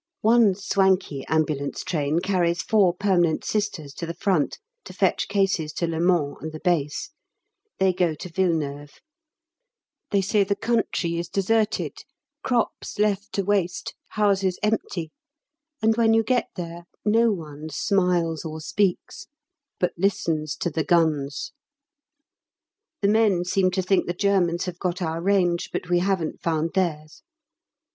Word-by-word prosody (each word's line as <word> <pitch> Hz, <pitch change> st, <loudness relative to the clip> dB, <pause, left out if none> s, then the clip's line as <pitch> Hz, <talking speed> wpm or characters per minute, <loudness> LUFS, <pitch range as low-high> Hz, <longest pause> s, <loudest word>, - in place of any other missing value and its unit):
One 220 Hz, -3 st, +5 dB
swanky 190 Hz, -7 st, +1 dB
Ambulance 155 Hz, -3 st, -1 dB
Train 155 Hz, -1 st, 0 dB
carries 175 Hz, -3 st, +1 dB
four 210 Hz, -6 st, +4 dB
permanent 180 Hz, -4 st, +1 dB
Sisters 195 Hz, -9 st, -2 dB
to 170 Hz, -, -6 dB
the 170 Hz, -, -5 dB
front 185 Hz, -8 st, 0 dB, 0.3 s
to -, -, -9 dB
fetch -, -, +1 dB
cases 195 Hz, -6 st, 0 dB
to 170 Hz, -, -1 dB
Le 165 Hz, -1 st, -2 dB
Mans 170 Hz, -5 st, +2 dB
and 160 Hz, -, -5 dB
the 155 Hz, -, -8 dB
Base. 160 Hz, -, -1 dB, 0.7 s
They 190 Hz, -1 st, +3 dB
go 175 Hz, -3 st, +1 dB
to 165 Hz, -, -8 dB
Villeneuve. 155 Hz, -5 st, -2 dB, 1.1 s
They 200 Hz, -, +2 dB
say 205 Hz, +1 st, +3 dB
the 200 Hz, +1 st, 0 dB
country 200 Hz, -7 st, 0 dB
is 170 Hz, -, -4 dB
deserted, 215 Hz, +2 st, 0 dB, 0.4 s
crops 245 Hz, -2 st, -1 dB
left 205 Hz, -1 st, 0 dB
to 200 Hz, -, 0 dB
waste, 190 Hz, -3 st, 0 dB
houses 195 Hz, -3 st, +1 dB
empty, 195 Hz, -6 st, -1 dB, 0.7 s
and 220 Hz, 0 st, +4 dB
when 225 Hz, -1 st, +4 dB
you 225 Hz, -, +4 dB
get 245 Hz, +1 st, +1 dB
there 170 Hz, -1 st, -7 dB, 0.2 s
no 225 Hz, +2 st, +4 dB
one 155 Hz, -4 st, -6 dB
smiles 175 Hz, -2 st, +1 dB
or 160 Hz, -1 st, -6 dB
speaks, 190 Hz, +3 st, -1 dB, 0.5 s
but 180 Hz, -, +1 dB
listens 160 Hz, -6 st, 0 dB
to 175 Hz, -, -2 dB
the 160 Hz, +1 st, -1 dB
guns. 150 Hz, -, +1 dB, 1.5 s
The 200 Hz, -, +3 dB
men 205 Hz, -4 st, +3 dB
seem 185 Hz, +1 st, +2 dB
to 185 Hz, +1 st, -1 dB
think 190 Hz, +1 st, +2 dB
the 175 Hz, -, -2 dB
Germans 185 Hz, -3 st, +1 dB
have 180 Hz, -1 st, -6 dB
got 180 Hz, 0 st, -2 dB
our 165 Hz, -2 st, -2 dB
range, 180 Hz, -2 st, +1 dB
but 180 Hz, -, -4 dB
we 175 Hz, -, +4 dB
haven't 180 Hz, -3 st, -1 dB
found 165 Hz, 0 st, 0 dB
theirs. 155 Hz, -5 st, -2 dB
180 Hz, 145 wpm, -24 LUFS, 160-200 Hz, 1.5 s, One